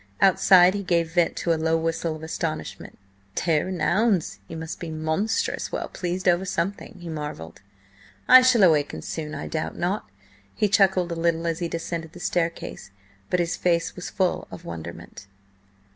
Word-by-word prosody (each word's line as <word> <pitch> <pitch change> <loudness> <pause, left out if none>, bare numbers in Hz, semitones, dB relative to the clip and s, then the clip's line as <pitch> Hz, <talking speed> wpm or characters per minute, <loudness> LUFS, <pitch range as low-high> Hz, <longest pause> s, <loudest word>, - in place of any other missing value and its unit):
Outside 185 -1 +6
he 200 - -2
gave 170 -3 0
vent 175 -2 +2
to 170 - 0
a 160 - -2
low 160 0 +2
whistle 165 0 -1
of 155 - -10
astonishment. 160 - -5 0.4
"Tare 160 -1 +1
an' 185 -2 -4
ouns! 205 -3 +1
he 165 - -8
must 160 0 -6
be 170 - -5
monstrous 160 +8 -1
well - - -3
pleased 180 +1 -3
over 175 +1 +4
something!" 190 +1 -3
he 175 - -9
marvelled. 150 - -6 0.7
"I 255 0 +10
shall 255 -4 +5
awaken 155 -5 +3
soon, 155 -1 -5
I 145 - -5
doubt 155 -1 -3
not." 180 - -2 0.5
He 210 - +1
chuckled 190 -3 +3
a - - -2
little 165 0 0
as 165 0 -1
he 170 - -1
descended 165 -1 -5
the 180 - -11
staircase, 165 - -2 0.4
but 180 - +1
his 175 0 0
face 170 -2 0
was 180 - -6
full 185 -2 -1
of 170 - -10
wonderment. 100 - -8
170 Hz, 175 wpm, -25 LUFS, 160-185 Hz, 0.7 s, I